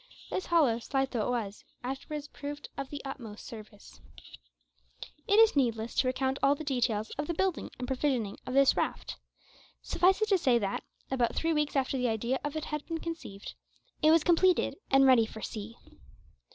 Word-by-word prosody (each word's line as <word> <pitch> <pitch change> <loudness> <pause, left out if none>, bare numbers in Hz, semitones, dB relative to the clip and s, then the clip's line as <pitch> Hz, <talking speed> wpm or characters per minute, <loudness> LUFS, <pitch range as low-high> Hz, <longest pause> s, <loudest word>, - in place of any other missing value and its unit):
This 375 - -2
hollow, 290 -10 +3
slight 270 +3 -1
though 225 -4 -1
it - - -1
was, 220 -5 -3 0.2
afterwards 285 +3 -5
proved 290 0 -7
of 275 -1 -5
the 285 -1 -7
utmost 235 -6 -7
service. 215 -2 -12 1.3
It 410 - +4
is 450 -4 +6
needless 230 -4 0
to 255 - +3
recount 265 +1 0
all 275 +1 +4
the 310 - -7
details 240 -6 0
of 295 - -1
the 340 - -2
building 380 0 -1
and 250 - -5
provisioning 255 -6 -1
of 255 - -3
this 275 -1 +5
raft. - - -2 0.7
Suffice 375 +2 +3
it 430 - 0
to 390 -3 +4
say 255 -6 +4
that, 200 -4 -2 0.3
about 245 -3 +1
three 330 0 +1
weeks 300 -1 0
after 270 -1 0
the 250 -1 +1
idea 235 +4 -1
of 295 +1 -3
it 310 - -3
had 300 -1 -4
been 330 - -2
conceived, 320 -13 -7 0.5
it 310 - +5
was 320 0 +5
completed 355 +2 +3
and 270 0 +6
ready 250 -4 +6
for 220 0 -9
sea. 220 +1 -6
270 Hz, 185 wpm, -30 LUFS, 235-300 Hz, 1.3 s, is